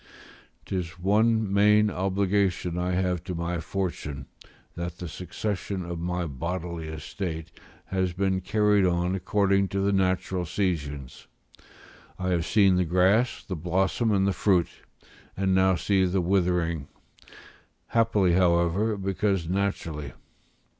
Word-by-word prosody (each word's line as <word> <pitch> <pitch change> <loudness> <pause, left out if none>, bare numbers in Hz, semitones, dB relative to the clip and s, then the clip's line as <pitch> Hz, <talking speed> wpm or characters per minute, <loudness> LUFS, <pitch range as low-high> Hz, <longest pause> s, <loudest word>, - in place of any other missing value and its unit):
'Tis 90 -3 -4
one 105 +2 +2
main 105 +1 +4
obligation 95 -2 0
I 90 +1 -1
have 90 -2 0
to 90 - -4
my 85 +1 -2
fortune, 80 -6 -4 0.5
that 85 0 -5
the 90 - -6
succession 90 +3 -4
of 85 -1 -5
my 90 +1 -2
bodily 85 +3 -4
estate 80 +1 -5 0.3
has 95 -1 -1
been 95 +1 0
carried 105 0 +2
on 90 0 +1
according 100 +1 +1
to 100 - -3
the 100 +1 +1
natural 95 -1 0
seasons; 75 -8 -3 0.9
I 95 0 -2
have 85 -3 0
seen 100 -4 +4
the 90 - +3
grass, 95 +8 +2
the 95 - -5
blossom, 95 +7 0
and 95 -2 +2
the 100 - +1
fruit, 90 -3 +2 0.7
and 95 0 +1
now 95 0 +4
see 95 +1 +1
the 95 +1 0
withering; 85 -4 0 1.0
happily, 110 -6 +3
however, 90 +4 +2
because 95 -2 -1
naturally. 85 -6 -2
90 Hz, 125 wpm, -26 LUFS, 85-100 Hz, 1.0 s, main